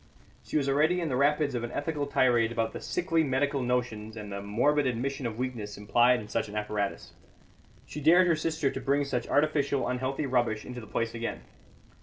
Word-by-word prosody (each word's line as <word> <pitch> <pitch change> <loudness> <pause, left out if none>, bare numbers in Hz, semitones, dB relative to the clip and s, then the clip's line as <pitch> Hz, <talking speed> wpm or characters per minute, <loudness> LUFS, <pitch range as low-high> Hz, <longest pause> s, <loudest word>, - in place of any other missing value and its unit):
She - - -2
was 140 -2 0
already 155 +6 +3
in 165 -3 -2
the 130 - -1
rapids 145 +1 +2
of 120 -1 -2
an 120 - -4
ethical 145 -1 -2
tirade 120 -4 +3
about 115 -1 -1
the - - -6
"sickly 170 -2 0
medical 140 0 0
notions" 115 -3 -2
and 105 -1 -7
the 100 0 -4
morbid 130 +8 +2
admission 130 +2 -2
of 110 -1 -6
weakness 120 -5 -4
implied 120 +4 +3
in 105 - -9
such 105 - -2
an 105 - -8
apparatus. 105 -1 -3 0.7
She 150 - -7
dared 175 +5 +6
her 170 -2 +3
sister 155 -2 -1
to - - -5
bring 140 +1 +1
such 125 -3 -2
artificial, 145 -2 +1
unhealthy 130 +3 -2
rubbish 120 -5 0
into 125 -1 -7
the 110 - -11
place 115 +2 -2
again. 115 0 -4
130 Hz, 200 wpm, -28 LUFS, 115-145 Hz, 0.7 s, dared